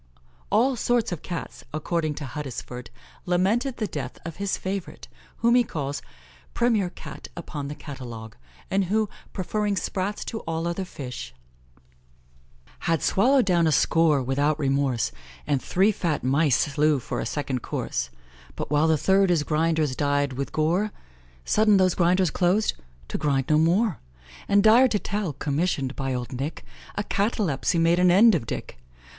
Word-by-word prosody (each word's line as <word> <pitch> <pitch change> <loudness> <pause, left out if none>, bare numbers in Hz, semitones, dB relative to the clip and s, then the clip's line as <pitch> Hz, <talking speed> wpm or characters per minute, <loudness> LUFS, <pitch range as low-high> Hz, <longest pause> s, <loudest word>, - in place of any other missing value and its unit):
All 250 +5 +3
sorts 240 -1 +1
of 175 - -4
Cats, 170 -3 -6
according 155 0 -1
to 145 - -5
Huddesford, 125 -3 -6 0.4
lamented 215 +9 +1
the 220 - -1
death - - -5
of 165 -2 -6
his 200 -1 -1
favourite, 190 -1 -5 0.4
whom 235 - +6
he 245 0 +5
calls 145 -8 -4 0.5
"premier 225 -6 +2
Cat - - -10
upon 150 -4 -5
the 145 - -6
catalogue," 120 -7 -8 0.4
and 195 0 +2
who, 215 +3 +1 0.2
preferring 205 +2 -1
sprats 195 +2 -2
to 225 - -4
all 165 -2 -3
other 170 +2 -2
fish: 125 - -7 1.5
"Had 165 -4 +1
swallow'd 255 +5 +4
down 175 -4 +3
a - - +3
score, 155 -1 +3
without 140 +4 +1
remorse, 135 - 0 0.3
And 140 -3 0
three 195 +4 +3
fat 170 -6 -2
mice 140 +1 +3
slew 150 +1 +2
for 125 - -4
a - - -2
second 135 -2 -2
course; 65 - -3 0.5
But, - - -5
while 150 +2 +3
the 160 -1 +3
third 190 +5 +3
his 170 -4 +2
grinders 155 -2 +1
dyed 145 0 +1
with 135 +2 -4
gore, 175 +7 +1 0.5
Sudden 215 -1 +4
those 185 -2 +3
grinders 180 -1 +2
clos'd 190 +4 +2 0.4
to - - -3
grind 135 -3 0
no 155 0 +4
more! 180 - +2 0.5
And, 200 0 +4
dire 230 +4 +7
to 220 - +1
tell! 205 -5 -3
commission'd 140 -2 -1
by 135 -1 -2
old 125 0 -3
Nick, 135 +5 -4 0.3
A 205 - -1
catalepsy 200 - 0
made 165 +1 +3
an 180 0 +5
end 210 +6 +7
of 145 -10 -1
Dick. 65 - -6
165 Hz, 160 wpm, -25 LUFS, 145-200 Hz, 1.5 s, dire